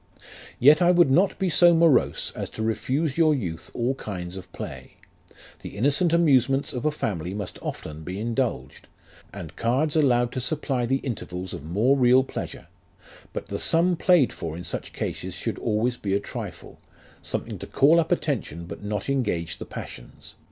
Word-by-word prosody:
"Yet 150 +6 +6
I 175 - +5
would 175 -5 +5
not 185 +8 +3
be 190 - 0
so 175 +1 +6
morose 165 -5 +3
as - - -4
to 110 - -2
refuse 135 +7 -1
your 155 -2 +5
youth 85 -10 -5
all 120 +3 0
kinds 90 -8 -6
of 95 -1 -10
play; 65 -1 -8 0.7
the - - -9
innocent 145 - +3
amusements 140 -5 +3
of 125 +3 -4
a 155 - +3
family 95 - -3
must 100 -3 -6
often 75 0 -6
be 90 +5 -6
indulged, 120 +2 -3 0.4
and 90 -4 -9
cards 135 +7 0
allowed 120 -5 +3
to 130 - -3
supply 135 -4 -1
the 135 +2 0
intervals 95 -7 -5
of - - -7
more 105 - +2
real 130 0 +5
pleasure; - - -7 0.7
but - - -6
the - - -3
sum 175 +2 +3
played 170 -5 +3
for 80 -1 -5
in 90 - -7
such - - -5
cases - - -4
should - - -4
always 120 +3 0
be 100 -1 -1
a - - +2
trifle; - - -8 0.4
something - - -4
to - - -7
call 155 +5 +4
up 165 +1 -1
attention 120 - -1
but 90 - -9
not 105 0 -3
engage 105 -12 -1
the - - -6
passions. - - -10
125 Hz, 175 wpm, -25 LUFS, 100-150 Hz, 0.7 s, Yet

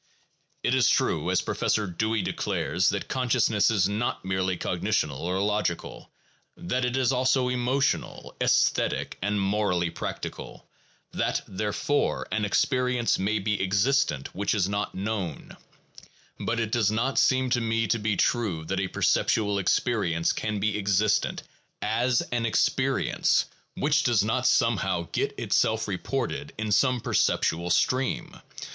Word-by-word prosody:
It - - +1
is - - +4
true, - - +1
as - - +2
Professor 105 - 0
Dewey 110 +4 -1
declares, 90 +3 0
that 100 -1 -3
consciousness 120 -5 +2
is 100 -4 +2
not 105 0 -2
merely 95 -1 -1
cognitional 70 -4 -1
or 90 +2 -2
logical, 105 -4 -2 0.5
that 125 +9 -2
it 125 +1 -1
is 130 -1 +2
also 130 0 +2
emotional, 125 +3 -1
esthetic, - - +1
and 100 +2 0
morally 95 -4 0
practical, - - -7 0.4
that, - - -1
therefore, 105 +9 -1
an 105 +1 0
experience 125 +3 +1
may 105 +3 0
be 105 0 -1
existent 100 - +1
which 100 +2 -1
is 95 -3 +1
not 100 +1 -3
known, 100 -3 -4 0.8
but 115 - -1
it 110 -2 -2
does 110 -3 +2
not 115 +5 0
seem 130 -1 +2
to 120 -1 +2
me 115 0 0
to 115 - 0
be 105 -2 -1
true 100 -10 0
that 95 +3 -2
a 95 - -1
perceptual 100 +2 +1
experience 95 -5 +1
can 110 -1 -3
be 105 +1 0
existent, 100 +1 +1 0.4
as 120 +3 +1
an 120 -1 0
experience, 110 - +1 0.3
which 145 0 +2
does 120 -7 +2
not 120 +4 0
somehow 95 -7 +1
get - - -2
itself - - +1
reported 70 - -3
in 110 0 -3
some 125 +3 +3
perceptual 85 -5 0
stream. 130 +9 0
105 Hz, 140 wpm, -26 LUFS, 95-120 Hz, 0.8 s, is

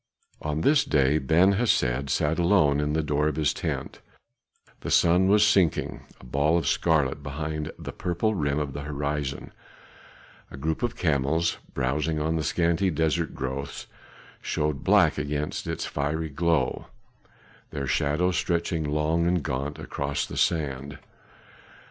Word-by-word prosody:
On 75 0 -2
this 145 - +4
day 70 +1 +2
Ben 85 +8 +4
Hesed 70 - +1
sat 75 +6 +1
alone 85 -6 +3
in 75 0 0
the 80 0 +1
door 75 0 +1
of 75 - -1
his 75 -2 +1
tent; - - -4 0.8
the - - -6
sun 90 +3 +4
was 105 +2 +5
sinking, 95 -6 +2 0.2
a - - -17
ball 70 +6 +2
of 85 - -1
scarlet 75 -4 +1
behind 75 +2 -4
the - - -7
purple 90 +5 -1
rim 70 -6 -1
of 75 -3 -2
the 70 - -5
horizon; 70 -1 -4 1.0
a - - -10
group 80 +3 -2
of 120 -1 -1
camels, 80 +1 0 0.2
browsing 75 +4 0
on 80 +2 0
the 80 - -1
scanty 85 +3 +1
desert 80 0 0
growths, 70 +1 -5 0.6
showed 75 -2 -2
black - - +4
against 75 +1 -3
its - - -3
fiery 75 +3 -2
glow, 80 -2 0 0.8
their 70 -2 -4
shadows 75 +8 +1
stretching 85 -2 -1
long 75 +3 0
and 90 -3 +1
gaunt 70 +1 -3
across 70 0 -3
the - - -8
sand. 70 -3 -1
75 Hz, 145 wpm, -26 LUFS, 70-85 Hz, 1.0 s, was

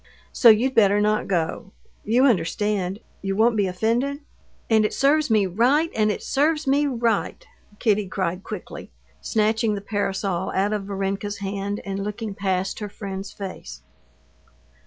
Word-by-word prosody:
"So 235 - +6
you'd 235 +5 +4
better 205 -3 +4
not 210 +1 +1
go.... 180 +1 -2 0.3
You 240 +5 +3
understand; 200 -2 0 0.2
you 195 0 -2
won't 225 +2 +3
be 205 -2 +2
offended?..." 235 +10 -1 0.5
"And 220 -1 +4
it 210 - -1
serves 295 +2 +3
me 215 -3 +3
right! 255 - +2
And 215 -1 +2
it - - -5
serves 305 +2 +1
me 285 +2 +2
right!" 235 -5 -1 0.3
Kitty 210 -3 +1
cried 185 -1 -3
quickly, - - -8 0.3
snatching 220 0 +1
the - - -3
parasol 195 -2 -2
out 200 +2 +1
of 205 -2 -3
Varenka's 200 +1 -3
hand, 200 +1 -4
and 195 0 -3
looking 210 +1 -4
past 190 -1 -2
her 210 -1 -5
friend's 195 0 -6
face. 70 - -8
205 Hz, 150 wpm, -23 LUFS, 195-230 Hz, 0.5 s, So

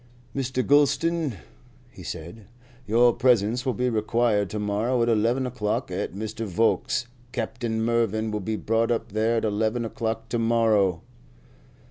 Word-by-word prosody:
"Mr. 130 -1 -1
Gulston," 145 0 +2 0.6
he - - -13
said, 90 +6 -8 0.4
"your 120 +3 +4
presence 120 +1 +2
will 130 - +1
be 125 0 0
required 110 -2 +1
to 105 - -4
morrow 105 +4 0
at 120 - +1
eleven 115 +4 +2
o'clock 120 -4 -2
at - - -3
Mr. 110 +2 -4
Volkes's. 115 +6 +1 0.3
Captain 115 -1 -2
Mervyn 110 -2 0
will 105 - -2
be 110 +3 -3
brought 115 +1 0
up 115 -3 -1
there 110 +2 +1
at 115 - 0
eleven 110 +3 0
o'clock 115 0 -3
to 120 - -1
morrow." 110 -6 +2
115 Hz, 145 wpm, -25 LUFS, 110-120 Hz, 0.6 s, your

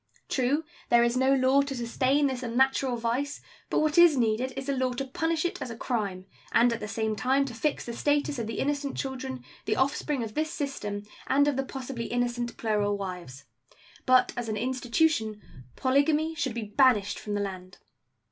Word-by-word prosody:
True, 270 +4 +1 0.3
there 235 0 +6
is 235 +1 +1
no 260 +1 +3
law 265 +1 +4
to 280 -1 -3
sustain 260 +4 +1
this 260 -2 -1
unnatural 260 +1 +1
vice; 245 +5 -2 0.3
but - - +2
what 310 +2 +3
is 340 -5 +7
needed 235 +2 +1
is 270 0 -4
a 280 - +1
law 255 -1 0
to 270 +3 -3
punish 325 +5 -1
it 350 - -2
as 255 - -4
a 230 - -7
crime, 200 -8 -2 0.3
and 235 +1 +4
at 230 - -4
the 210 - -5
same 220 0 -1
time 265 +6 +2
to 260 - -6
fix 285 +6 -1
the 235 - -5
status 290 +1 0
of 225 - -3
the 225 - -4
innocent 285 0 -1
children, 265 -1 -4 0.2
the - - +1
offspring 275 0 0
of 215 -1 -6
this 310 +3 -1
system, 215 -10 -4 0.2
and 285 +2 +4
of 290 - +2
the 270 - +1
possibly 265 -3 -5
innocent 240 0 -2
plural 210 -2 0
wives. 180 -9 -7 0.6
But 255 0 +5
as 240 -2 -4
an 215 - -2
institution 245 -1 0 0.4
polygamy 295 +4 +2
should 270 -7 -2
be 235 - -3
banished 210 -2 +3
from 210 -1 -4
the 205 - 0
land. 185 -2 -6
255 Hz, 195 wpm, -28 LUFS, 225-275 Hz, 0.6 s, is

